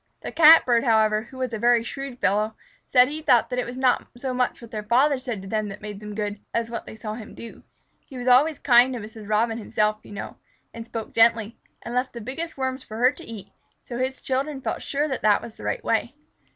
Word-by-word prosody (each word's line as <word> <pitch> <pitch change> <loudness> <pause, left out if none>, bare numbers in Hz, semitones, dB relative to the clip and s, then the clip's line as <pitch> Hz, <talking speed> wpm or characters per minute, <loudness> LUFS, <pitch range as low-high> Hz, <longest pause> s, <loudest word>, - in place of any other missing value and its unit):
The - - -6
Catbird, 305 -7 +7
however, 220 -2 +3
who 260 - -12
was 255 -2 -3
a 220 - -3
very 240 0 +4
shrewd 275 0 -6
fellow, 215 0 0 0.3
said 250 -1 +5
he 305 +3 -5
thought 250 -6 +3
it 250 0 -1
was 245 +1 -7
not 260 -1 +2
so 255 +1 -3
much 250 0 0
what 235 -1 -12
their 215 -2 -4
father 260 +6 +3
said 245 -7 -5
to - - -9
them 215 +1 -1
that 195 +1 -8
made 210 -2 -7
them 210 0 -8
good, 205 -1 -3 0.2
as 230 0 -1
what 230 - -5
they - - -9
saw 215 -1 -6
him 220 -1 -9
do. 230 - -10 0.5
He 265 - -10
was 245 0 -5
always 280 +5 +5
kind 250 -1 +5
to - - -4
Mrs. 215 -1 -10
Robin 225 +2 +1
himself, 215 0 0
you - - -15
know, 200 - -7 0.4
and 230 0 -8
spoke 225 -1 -6
gently, 230 -1 +3 0.2
and 235 - -6
left 250 +1 -1
the 235 - -7
biggest 280 +9 -5
Worms 260 0 -3
for 220 - -9
her 250 +3 +4
to - - -12
eat, 210 -4 -9 0.3
so 240 -1 -7
his 260 +1 -2
children 270 +2 -2
felt - - -4
sure 290 +2 -1
that 265 -4 -3
this 210 -1 +4
was 230 -2 -10
the - - -10
right - - -2
way. - - 0
235 Hz, 240 wpm, -24 LUFS, 215-260 Hz, 0.5 s, Catbird